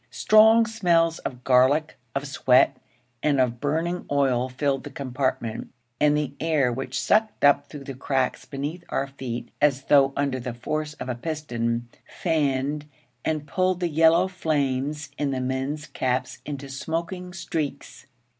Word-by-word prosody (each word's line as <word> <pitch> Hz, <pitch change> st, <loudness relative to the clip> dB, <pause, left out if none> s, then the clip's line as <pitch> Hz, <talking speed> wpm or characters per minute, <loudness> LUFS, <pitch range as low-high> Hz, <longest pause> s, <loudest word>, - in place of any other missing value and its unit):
Strong 220 Hz, +1 st, +6 dB
smells 170 Hz, -7 st, +2 dB
of 125 Hz, -1 st, -6 dB
garlic, 135 Hz, +5 st, +3 dB, 0.2 s
of 140 Hz, +1 st, -1 dB
sweat, 135 Hz, -1 st, +3 dB, 0.5 s
and 145 Hz, -3 st, +2 dB
of 120 Hz, -2 st, +1 dB
burning 165 Hz, +5 st, -1 dB
oil 130 Hz, -3 st, +1 dB
filled 135 Hz, +1 st, -1 dB
the -, -, -7 dB
compartment, 130 Hz, -4 st, -3 dB, 0.3 s
and 150 Hz, 0 st, +4 dB
the 145 Hz, -2 st, -2 dB
air, 150 Hz, -6 st, +2 dB
which 130 Hz, +1 st, -3 dB
sucked 215 Hz, +1 st, +1 dB
up 145 Hz, 0 st, +4 dB
through 145 Hz, -2 st, -8 dB
the 135 Hz, -, -6 dB
cracks 130 Hz, 0 st, -1 dB
beneath 150 Hz, +5 st, -5 dB
our 135 Hz, -, 0 dB
feet 130 Hz, -3 st, -6 dB
as 140 Hz, -2 st, +3 dB
though 135 Hz, -1 st, +5 dB
under 140 Hz, -2 st, 0 dB
the 120 Hz, -1 st, -5 dB
force 150 Hz, +5 st, -3 dB
of -, -, -7 dB
a 125 Hz, -, -1 dB
piston, 120 Hz, -4 st, -3 dB, 0.3 s
fanned 145 Hz, -2 st, 0 dB, 0.4 s
and 155 Hz, -2 st, -1 dB
pulled 185 Hz, +3 st, 0 dB
the 175 Hz, -2 st, 0 dB
yellow 165 Hz, +3 st, +4 dB
flames 150 Hz, -4 st, -1 dB
in 145 Hz, -1 st, 0 dB
the 135 Hz, -1 st, -1 dB
men's 135 Hz, +4 st, -2 dB
caps 130 Hz, -2 st, -2 dB
into 140 Hz, -1 st, -5 dB
smoking 170 Hz, +6 st, -4 dB
streaks. 165 Hz, -6 st, -5 dB
145 Hz, 150 wpm, -25 LUFS, 130-160 Hz, 0.5 s, Strong